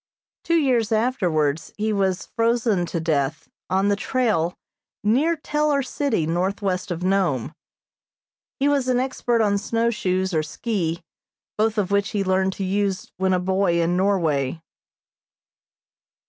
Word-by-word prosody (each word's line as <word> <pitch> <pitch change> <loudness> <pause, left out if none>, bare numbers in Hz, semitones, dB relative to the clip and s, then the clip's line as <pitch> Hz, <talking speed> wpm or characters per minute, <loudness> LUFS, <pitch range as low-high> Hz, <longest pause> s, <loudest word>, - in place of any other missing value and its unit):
Two 335 - +1
years 250 -8 +2
afterwards 180 - 0
he 215 +1 0
was 195 -2 0
frozen 230 -5 +1
to 170 - -2
death 155 -1 -1 0.2
on 190 +2 +2
the 205 - +3
trail 205 -8 0 0.5
near 270 +11 +3
Teller 300 -2 0
City, 255 - -1
northwest 185 +3 -1
of 175 0 -3
Nome. 185 -10 +1 1.1
He 275 - +2
was 280 -3 +1
an 250 -1 +2
expert 245 -2 0
on 200 -1 +2
snowshoes 200 -4 0
or 155 - +2
ski, 170 +1 -3 0.5
both 220 +1 +1
of 200 -2 0
which 200 +1 +2
he 200 - +1
learned 190 0 +1
to 195 - -5
use 195 0 -1
when 190 0 +1
a 185 - +2
boy 185 -1 +1
in 170 +1 +1
Norway. 165 -7 +1
195 Hz, 135 wpm, -23 LUFS, 175-230 Hz, 1.1 s, the